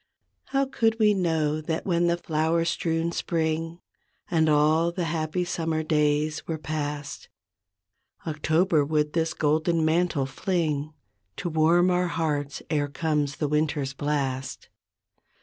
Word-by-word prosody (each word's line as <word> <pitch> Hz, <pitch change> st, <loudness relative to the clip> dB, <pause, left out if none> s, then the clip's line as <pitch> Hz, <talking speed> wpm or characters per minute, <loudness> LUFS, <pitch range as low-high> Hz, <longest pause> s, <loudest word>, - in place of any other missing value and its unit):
How 275 Hz, 0 st, +1 dB
could 225 Hz, -4 st, +1 dB
we 215 Hz, -2 st, +4 dB
know 160 Hz, -5 st, 0 dB
that 160 Hz, +1 st, -3 dB
when 175 Hz, -2 st, +2 dB
the 170 Hz, 0 st, +2 dB
flower 165 Hz, 0 st, 0 dB
strewn 165 Hz, 0 st, -1 dB
spring 165 Hz, 0 st, -2 dB, 0.5 s
And 160 Hz, -2 st, +3 dB
all 155 Hz, +3 st, +3 dB
the 175 Hz, +1 st, -3 dB
happy 165 Hz, +2 st, -1 dB
summer 165 Hz, -2 st, -1 dB
days 150 Hz, 0 st, 0 dB
were 160 Hz, -, -2 dB
past, 145 Hz, -1 st, -5 dB, 1.0 s
October 160 Hz, +1 st, +2 dB
would 150 Hz, 0 st, 0 dB
this 165 Hz, -1 st, 0 dB
golden 160 Hz, +2 st, +1 dB
mantle 160 Hz, -3 st, +1 dB
fling 155 Hz, -1 st, -2 dB, 0.4 s
To 175 Hz, -, -3 dB
warm 170 Hz, +3 st, +3 dB
our 180 Hz, 0 st, +1 dB
hearts 150 Hz, -4 st, -2 dB
e'er 145 Hz, -2 st, +1 dB
comes 150 Hz, -1 st, -1 dB
the 150 Hz, -, -1 dB
winter's 145 Hz, -2 st, 0 dB
blast. 135 Hz, -2 st, -3 dB
160 Hz, 130 wpm, -26 LUFS, 150-170 Hz, 1.0 s, we